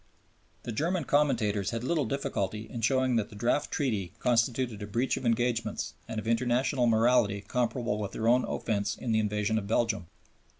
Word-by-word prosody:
The 120 Hz, -, -4 dB
German 165 Hz, -, 0 dB
commentators 115 Hz, -10 st, +1 dB
had 115 Hz, 0 st, -3 dB
little 150 Hz, +1 st, +1 dB
difficulty 110 Hz, -5 st, -2 dB
in 120 Hz, -, -6 dB
showing 130 Hz, +1 st, +2 dB
that 105 Hz, -2 st, -1 dB
the -, -, -12 dB
draft 120 Hz, +7 st, 0 dB
Treaty 105 Hz, -, -1 dB
constituted 120 Hz, -1 st, +1 dB
a 105 Hz, -, -5 dB
breach 120 Hz, +5 st, 0 dB
of 130 Hz, -, -3 dB
engagements 115 Hz, 0 st, 0 dB
and 110 Hz, -, -3 dB
of 110 Hz, -, -6 dB
international 125 Hz, +2 st, +2 dB
morality 115 Hz, -2 st, +3 dB
comparable 120 Hz, -1 st, -1 dB
with 100 Hz, -2 st, -4 dB
their 115 Hz, -, -1 dB
own 125 Hz, +2 st, +5 dB
offense 105 Hz, -3 st, -1 dB
in 120 Hz, -, -3 dB
the 110 Hz, -, +3 dB
invasion 105 Hz, +1 st, 0 dB
of 100 Hz, -, -7 dB
Belgium. 110 Hz, -4 st, 0 dB
115 Hz, 175 wpm, -29 LUFS, 105-125 Hz, -, own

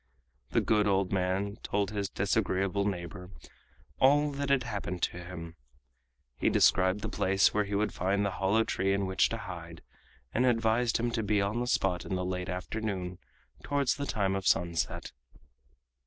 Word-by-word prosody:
The -, -, +2 dB
good 105 Hz, -1 st, +2 dB
old 95 Hz, -1 st, +1 dB
man 95 Hz, +2 st, 0 dB
told 100 Hz, 0 st, -1 dB
his 100 Hz, -2 st, -2 dB
disagreeable 95 Hz, +2 st, 0 dB
neighbor 90 Hz, -1 st, -5 dB, 0.7 s
all 145 Hz, +2 st, +4 dB
that 140 Hz, 0 st, -3 dB
had 135 Hz, -2 st, +3 dB
happened 100 Hz, -6 st, -4 dB
to 90 Hz, -, -1 dB
him. 85 Hz, -2 st, -8 dB, 0.8 s
He -, -, +3 dB
described 95 Hz, +2 st, +3 dB
the -, -, -3 dB
place 95 Hz, +1 st, +2 dB
where 105 Hz, 0 st, +1 dB
he 100 Hz, 0 st, -3 dB
would 105 Hz, +2 st, 0 dB
find 100 Hz, +3 st, 0 dB
the 100 Hz, -, 0 dB
hollow 100 Hz, +4 st, +2 dB
tree 95 Hz, -2 st, 0 dB
in 100 Hz, 0 st, 0 dB
which 95 Hz, 0 st, +2 dB
to -, -, -3 dB
hide, -, -, -8 dB, 0.5 s
and 125 Hz, -, +2 dB
advised 115 Hz, -1 st, +2 dB
him 120 Hz, +1 st, -1 dB
to 115 Hz, -1 st, -1 dB
be 105 Hz, -1 st, +1 dB
on 100 Hz, +4 st, 0 dB
the 125 Hz, -, -2 dB
spot 95 Hz, -6 st, +1 dB
in 95 Hz, -, -3 dB
the 90 Hz, 0 st, -2 dB
late 90 Hz, 0 st, -3 dB
afternoon 90 Hz, -1 st, -4 dB, 0.4 s
towards 140 Hz, -2 st, +1 dB
the 140 Hz, -1 st, -4 dB
time 100 Hz, -4 st, 0 dB
of 95 Hz, -1 st, -2 dB
sunset. 85 Hz, -1 st, 0 dB
100 Hz, 170 wpm, -30 LUFS, 95-110 Hz, 0.8 s, all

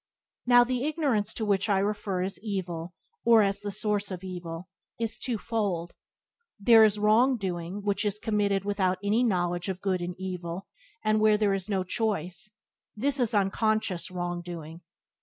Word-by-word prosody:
Now 245 Hz, 0 st, +7 dB
the 250 Hz, 0 st, -1 dB
ignorance 275 Hz, -10 st, 0 dB
to 220 Hz, -, -2 dB
which 200 Hz, 0 st, +1 dB
I 200 Hz, -, +3 dB
refer 200 Hz, -2 st, -1 dB
as 190 Hz, +1 st, -4 dB
evil, 175 Hz, -5 st, -4 dB, 0.3 s
or 230 Hz, -2 st, +6 dB
as 200 Hz, 0 st, 0 dB
the 205 Hz, 0 st, -5 dB
source 205 Hz, 0 st, -1 dB
of 185 Hz, -1 st, -6 dB
evil, 175 Hz, -1 st, -6 dB, 0.3 s
is 225 Hz, -1 st, -3 dB
two 245 Hz, -4 st, -1 dB
fold. 200 Hz, -7 st, -2 dB, 0.7 s
There 225 Hz, +2 st, +7 dB
is 210 Hz, -1 st, +4 dB
wrong 225 Hz, +5 st, +4 dB
doing 185 Hz, 0 st, -4 dB
which 205 Hz, +1 st, 0 dB
is 210 Hz, -1 st, 0 dB
committed 205 Hz, -3 st, 0 dB
without 190 Hz, -2 st, +1 dB
any 215 Hz, +4 st, +2 dB
knowledge 175 Hz, -4 st, 0 dB
of 185 Hz, -1 st, -3 dB
good 190 Hz, -2 st, -1 dB
and 175 Hz, 0 st, -4 dB
evil, 180 Hz, -1 st, -5 dB, 0.4 s
and 215 Hz, 0 st, +2 dB
where 215 Hz, 0 st, +5 dB
there 210 Hz, -2 st, +2 dB
is 195 Hz, +1 st, -3 dB
no 190 Hz, -2 st, 0 dB
choice 185 Hz, -2 st, -2 dB, 0.2 s
— -, -, -61 dB
this 275 Hz, +5 st, 0 dB
is 235 Hz, -3 st, +1 dB
unconscious 205 Hz, -2 st, 0 dB
wrong 175 Hz, -1 st, -3 dB
doing. 165 Hz, -1 st, -8 dB
200 Hz, 175 wpm, -28 LUFS, 180-215 Hz, 0.7 s, Now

